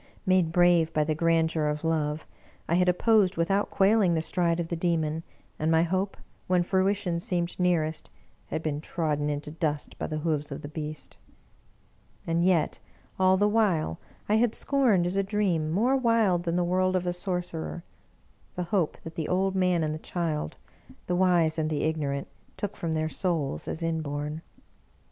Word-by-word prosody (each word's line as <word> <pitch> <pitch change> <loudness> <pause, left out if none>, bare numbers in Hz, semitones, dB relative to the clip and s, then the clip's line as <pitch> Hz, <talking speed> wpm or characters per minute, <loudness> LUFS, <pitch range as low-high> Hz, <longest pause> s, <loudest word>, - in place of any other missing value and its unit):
Made 185 -3 +3
brave 175 -2 +4
by 155 - +2
the 155 +1 0
grandeur 160 -1 +1
of 150 +1 -2
love, 155 -1 -1 0.4
I - - 0
had 180 +1 +4
opposed 200 0 +3
without 195 +5 +1
quailing 195 -3 +3
the 160 - 0
stride 170 0 0
of 165 -1 -3
the 170 - -1
Demon, 165 -2 0 0.4
and 155 - 0
my 160 0 +4
hope, 190 +3 -1 0.3
when 180 -1 +3
fruition 190 -1 +1
seemed 175 0 -2
nearest, 165 -3 0 0.4
had 160 - -4
been 150 -1 -2
trodden 150 -3 -1
into 145 0 -4
dust 155 -2 -2
by - - -2
the 155 - -3
hoofs 150 -2 -1
of 140 +3 -6
the - - -5
beast! 155 0 -7 1.1
And 165 +1 +1
yet, 175 -4 +2 0.4
all 185 0 +5
the 205 +2 +3
while, 190 - +1 0.3
I 215 - +3
had 230 0 +2
scorned, 245 -11 +2
as 180 +2 -2
a - - +4
dream, 190 -6 0
more 230 +11 +2
wild 225 -8 +2
than 170 0 0
the 180 - +2
word 185 +1 +1
of 180 -1 0
a 175 - 0
sorcerer, 175 - -4 0.7
the 180 - -2
hope 175 -2 0
that 165 - -8
the. 160 -2 -4
old 190 +1 +1
man 180 -3 +2
and 155 0 -1
the 155 - -5
child, 160 - -3 0.5
the 180 - -1
wise 175 -3 +3
and 155 -1 0
the 150 -2 -1
ignorant, 145 -3 -1 0.3
took 205 -1 -4
from 165 -1 -3
their 155 0 0
souls 155 - -2
as 165 - -4
inborn. 155 -1 -3
170 Hz, 175 wpm, -27 LUFS, 155-185 Hz, 1.1 s, all